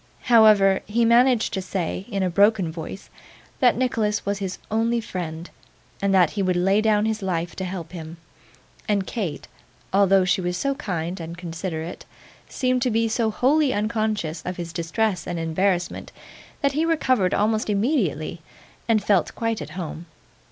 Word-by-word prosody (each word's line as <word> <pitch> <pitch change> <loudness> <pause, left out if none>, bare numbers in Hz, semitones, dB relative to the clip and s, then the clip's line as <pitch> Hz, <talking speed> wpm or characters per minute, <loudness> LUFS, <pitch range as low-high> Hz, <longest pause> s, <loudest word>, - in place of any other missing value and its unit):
However, 215 -5 +5
he 230 +3 +2
managed 240 0 +4
to 190 - -1
say, 185 0 -3
in 200 -4 -1
a 185 - +1
broken 200 -2 +3
voice, 165 +4 -8 0.5
that 245 -3 +4
Nicholas 225 -4 0
was 200 0 -1
his 190 -2 -4
only 230 +2 +1
friend, 175 -6 -5 0.5
and 200 0 +1
that 185 -4 +4
he 205 - -2
would 185 -1 +1
lay 195 +4 +3
down 215 -1 +2
his 220 0 -1
life 175 -3 -2
to 190 - -3
help 180 -3 -6
him; 165 -2 -8 0.7
and 200 -2 +1
Kate, 185 -11 -4 0.5
although 195 -1 +4
she 185 +1 +1
was 180 0 -2
so 275 +6 0
kind 180 - -4
and 165 +1 -7
considerate, 170 -1 -5 0.4
seemed 255 -1 0
to 250 - +2
be 225 0 +1
so 225 0 0
wholly 275 +6 +2
unconscious 210 -6 -1
of 180 0 -5
his 170 -1 -6
distress 185 +3 -1
and 175 - -3
embarrassment, 175 +2 -1 0.5
that 280 -1 +2
he 300 +4 0
recovered 260 - +2
almost 215 +1 +1
immediately 200 - 0 0.5
and 215 -3 +3
felt 195 -5 +1
quite 230 -1 -2
at - - -7
home. 170 -1 -6
195 Hz, 165 wpm, -23 LUFS, 175-225 Hz, 0.7 s, However